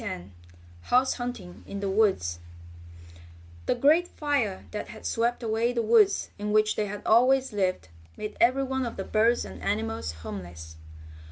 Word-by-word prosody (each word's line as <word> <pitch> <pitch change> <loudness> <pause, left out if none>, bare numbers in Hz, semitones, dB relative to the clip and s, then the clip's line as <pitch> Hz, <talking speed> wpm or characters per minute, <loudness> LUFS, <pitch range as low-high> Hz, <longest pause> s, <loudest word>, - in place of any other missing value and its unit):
STORY - - -3
X 90 - -10 0.6
HOUSE 255 +2 +3
HUNTING 245 -8 -6
IN 200 - -5
THE 200 - -2
WOODS 190 - +1 1.3
The - - +2
great 305 +8 +4
fire 280 - -1
that 210 - -5
had 220 - -11
swept 235 +2 0
away 230 +2 0
the 235 -1 0
woods 220 -2 +3
in 210 0 -2
which 215 0 +3
they 210 - -1
had 205 0 -6
always 255 +2 +4
lived 185 - -1 0.3
made 210 0 -5
every 255 +3 +4
one 265 -1 -2
of 230 - -7
the 195 - -3
birds 225 +4 +2
and - - -10
animals 215 - -2
homeless. 80 -5 -8
220 Hz, 165 wpm, -27 LUFS, 200-245 Hz, 1.3 s, great